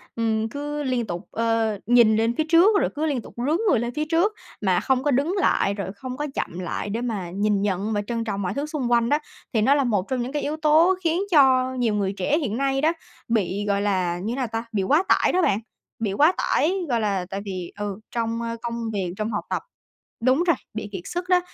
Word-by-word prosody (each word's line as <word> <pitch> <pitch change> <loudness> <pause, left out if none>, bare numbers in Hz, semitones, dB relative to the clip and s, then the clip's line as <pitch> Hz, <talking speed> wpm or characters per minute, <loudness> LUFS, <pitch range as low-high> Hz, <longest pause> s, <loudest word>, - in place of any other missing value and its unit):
ừm, 225 -1 0
cứ 290 +2 -4
liên 250 -3 0
tục, 175 0 -4
ờ, 225 -2 0
nhìn 235 -2 +5
lên 225 +2 +1
phía 315 - +2
trước 385 +5 +6
rồi - - +1
cứ 310 +2 -1
liên 275 -6 0
tục - - -13
rướn 290 +7 +1
người 245 - +4
lên 240 +1 -3
phía 305 0 -1
trước 345 +7 +2 0.3
mà 185 -4 +2
không 260 0 +1
có 290 - +2
đứng 285 +9 +1
lại 200 - +2
rồi 195 -2 -4
không 255 +4 -7
có 295 0 -2
chậm 175 - -3
lại 185 +3 -3
để 225 +4 -2
mà 200 -8 -3
nhìn 205 +1 +1
nhận 205 +2 -1
và 205 - 0
trân 230 -1 -2
trọng 200 -2 -3
mọi 180 - -2
thứ 285 +2 -2
xung 285 -6 -3
quanh 235 0 +3
đó, 295 - +4 0.4
thì 220 - +2
nó 270 +6 +4
là 280 - +2
một 205 -6 0
trong 255 -2 0
những 250 +2 -4
cái 295 - -2
yếu 305 +2 -2
tố 315 +4 +4
khiến 335 +3 +1
cho 260 -4 +5
nhiều 240 -4 0
người 200 -1 0
trẻ 295 +2 +1
hiện 235 -7 -2
nay 270 0 +1
đó, 320 +2 +3 0.3
bị 205 -3 0
gọi 200 0 +1
là 185 -4 0
như 220 - -2
thế - - -2
nào 260 -2 -1
ta? 225 +1 -3
Bị 200 -3 0
quá 300 - +3
tải - - +4
đó 370 - +2
bạn, 205 - +2 0.4
bị 205 -4 -1
quá 300 - +5
tải. 335 +5 +2 0.2
Gọi 235 -2 +2
là 195 -4 0
tại 195 +1 -4
vì 185 -3 -5
ừ, 205 -1 -4
trong, 230 -1 -2
a, 230 0 -3
công 235 -1 -3
việc, 185 -3 -2
trong 220 +1 -2
học 210 - -2
tập - - -2 0.6
đúng 260 +7 +3
rồi, 335 - +5 0.2
bị 215 -1 -5
kiệt 190 -3 -5
sức 355 +1 -4
đó. 360 - +5
235 Hz, 250 wpm, -24 LUFS, 205-285 Hz, 0.6 s, trước